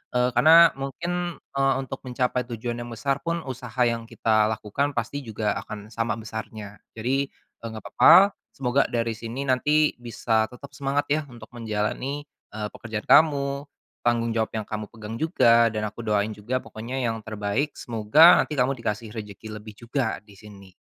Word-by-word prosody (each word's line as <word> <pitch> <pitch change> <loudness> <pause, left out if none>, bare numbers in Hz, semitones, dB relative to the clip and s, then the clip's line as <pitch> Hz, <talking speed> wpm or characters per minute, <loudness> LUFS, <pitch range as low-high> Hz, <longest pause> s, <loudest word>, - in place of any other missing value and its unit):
Eee, 125 0 +3
karena, 165 +6 +7
mungkin, 175 +6 -3
eee, 135 0 0
untuk 135 0 -7
mencapai 125 0 0
tujuan 120 0 -4
yang 120 - -7
besar 135 +4 -1
pun, 170 0 -3
usaha 125 -2 -5
yang 115 -1 -1
kita 110 -2 +2
lakukan 110 +7 -2
pasti 145 - -2
juga 110 -3 -2
akan 105 0 -9
sama 115 -1 -1
besarnya. 110 -2 -8 0.2
Jadi, 135 +5 0
eee, 115 - -14
nggak 110 -2 -8
papa. 190 +5 +7 0.2
Semoga, 135 +1 +1
dari 115 -1 -1
sini 115 +4 -5
nanti, 150 +4 +3
bisa 115 -2 0
tetap 125 +5 -12
semangat, 140 +1 -1
ya, 155 +1 +3
untuk 120 -3 -13
menjalani, 120 +5 -3 0.3
eee, 105 -1 -3
pekerjaan 110 -2 -6
kamu, 140 -2 +3 0.3
tanggung 115 -1 +1
jawab 110 -1 0
yang 110 - -3
kamu 105 0 -5
pegang 110 -1 -9
juga, 115 -5 +4
dan 105 0 -3
aku 105 +2 -6
doain 105 -1 0
juga, 115 +5 -3
pokoknya 120 +2 -6
yang 115 -1 -2
terbaik. 110 +7 -2
Semoga 115 +9 +6
nanti 150 - -4
kamu 130 +2 +2
dikasih 110 -2 -4
rejeki 110 -1 -8
lebih 105 -1 -12
juga, 120 0 -2
di 105 - -17
sini. 100 -2 -14
115 Hz, 165 wpm, -25 LUFS, 110-135 Hz, 0.3 s, karena